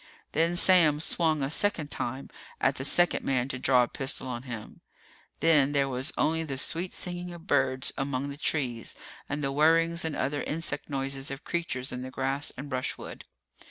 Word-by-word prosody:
Then 165 +3 +1
Sam 170 -5 +5
swung 160 -2 +1
a 135 - -1
second 165 -5 +1
time, 130 +3 -4 0.3
at - - +2
the 130 - -4
second 175 +4 +3
man 130 -2 0
to 130 - -4
draw 125 -1 +4
a - - -1
pistol 135 0 -1
on 120 -2 -4
him. 110 -3 -8 0.6
Then 150 -4 +4
there 140 -1 +2
was 130 +4 -2
only 160 +1 +1
the 140 -4 -5
sweet 170 +6 +2
singing 175 0 -6
of 170 0 -13
birds 130 -8 +1
among 135 0 -2
the 140 - -7
trees 130 -7 -2 0.3
and 145 +1 -3
the 135 - 0
whirrings 165 +3 +3
and 160 -2 -2
other 145 +2 -1
insect 165 +1 -3
noises 135 0 -2
of 135 +2 -7
creatures 145 -7 -3
in 125 0 -5
the 130 - -6
grass 135 +3 -1
and 140 - -6
brushwood. 130 -2 -4
140 Hz, 185 wpm, -28 LUFS, 130-165 Hz, 0.6 s, Sam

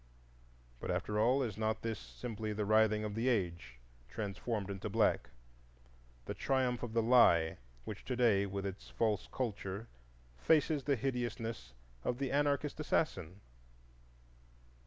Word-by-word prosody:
But, - - -6
after 105 0 -1
all, 125 +5 +4
is 110 -4 -4
not 110 0 -1
this 110 -2 -2
simply 110 -3 -5
the 105 0 -1
writhing 110 0 +4
of 105 -1 -3
the 115 +4 -1
age 85 - -1 0.3
translated 105 - -3
into 95 -1 -4
black,—the - - -3
triumph 130 -3 0
of 120 -2 -5
the 115 -1 +2
Lie 85 -9 +5 0.3
which - - -6
today, 115 -6 +2
with 100 0 -4
its 100 0 -6
false 110 -3 0
culture, 105 -3 -3 0.5
faces 150 - +3
the 140 - +3
hideousness 120 - -3 0.3
of 125 - -1
the 135 0 -2
anarchist 145 +1 +1
assassin? 105 - -1
110 Hz, 130 wpm, -34 LUFS, 95-125 Hz, 0.5 s, Lie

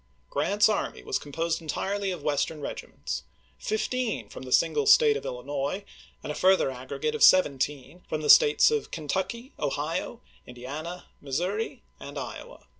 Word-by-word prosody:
Grant's 200 +9 +3
army 215 - -2
was - - -1
composed 165 +4 -2
entii'ely 195 +5 -2
of 180 - -6
Western 145 +1 0
regi 145 - -6
ments; - - -5 0.4
fifteen 250 - -2
from - - -9
the 130 -1 -8
single 440 - +3
State 445 0 +7
of - - -5
Illinois, 140 +8 -3 0.4
and - - -4
a - - -3
further 185 -5 +3
aggregate 130 - -4
of 455 - 0
seventeen 145 -1 +3
from 155 - -2
the 150 - -3
States 455 -1 +6
of 445 -1 -1
Kentucky, 190 - -3
Ohio, - - -2 0.3
Indiana, 145 +8 -7 0.2
Missouri, 190 - -2 0.2
and 145 +1 -8
Iowa. 130 -3 -8
165 Hz, 150 wpm, -27 LUFS, 140-215 Hz, 0.4 s, State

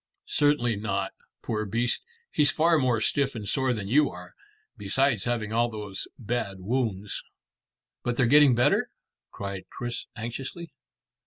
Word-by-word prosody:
"Certainly 120 -7 +2
not. 100 -2 -2 0.3
Poor 110 -1 -1
beast, 115 +4 0 0.3
he's 145 -1 +5
far 165 +1 +3
more 125 -4 +2
stiff 135 +4 +1
and 105 -3 -5
sore 130 +5 +1
than 105 -5 -3
you 140 +5 +4
are, 90 0 -11 0.4
besides 115 +3 +1
having 115 -3 -1
all 120 +1 +2
those 105 -4 -4
bad 110 -4 -3
wounds." 105 -1 -2 0.8
"But 120 0 -2
they're 130 - +4
getting 145 0 +6
better?" 120 - +3 0.4
cried 100 -1 -6
Chris 120 0 -5
anxiously. 130 +8 -6
120 Hz, 140 wpm, -27 LUFS, 105-130 Hz, 0.8 s, getting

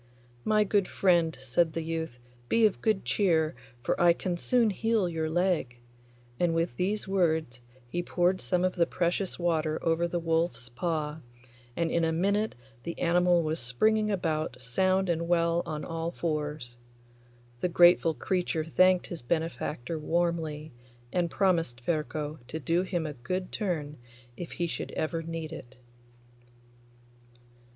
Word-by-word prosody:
'My 215 -1 +3
good 200 -1 +1
friend,' 170 -5 +2
said 160 +5 +1
the 165 - -2
youth, 160 -5 -4 0.3
'be 230 -1 +4
of 210 - +1
good 215 -4 +1
cheer, 165 -5 +2 0.3
for - - 0
I 175 -1 +7
can 180 +1 -3
soon 230 +5 +2
heal 225 -1 +1
your 160 -2 -2
leg,' 170 -8 0 0.6
and 175 -2 +2
with 165 -7 0
these 200 +8 -1
words 160 -9 0 0.3
he 175 +8 -2
poured 180 +1 +1
some 180 -1 0
of 185 0 +2
the 170 -2 +3
precious 175 +2 -1
water 160 -3 0
over 165 +1 +2
the 175 - -2
wolf's 165 -7 -1
paw, 155 +3 -2 0.6
and 170 -1 0
in 170 - +2
a 165 - +2
minute 200 +6 +1 0.3
the 170 +4 -6
animal 175 0 +3
was 155 +1 -1
springing 215 - +2
about 155 - -1
sound 185 +10 +1
and 170 -1 0
well 170 0 +2
on 155 -1 -4
all 165 0 -3
fours. 150 -7 -3 0.8
The 180 - 0
grateful 175 -1 +5
creature 180 -3 -1
thanked 185 +2 +4
his 170 - -7
benefactor 160 0 -2
warmly, 160 -2 -1 0.4
and 175 -2 +1
promised 165 -11 +1
Ferko 155 -2 -2
to 155 +5 -5
do 165 +5 +1
him 180 -3 -2
a 150 - -4
good 180 +9 -4
turn 155 -7 -2 0.4
if 175 - -7
he 175 - -1
should 170 - -4
ever 165 +1 -2
need 165 -1 -5
it. 130 -4 -10
170 Hz, 150 wpm, -29 LUFS, 155-180 Hz, 0.8 s, I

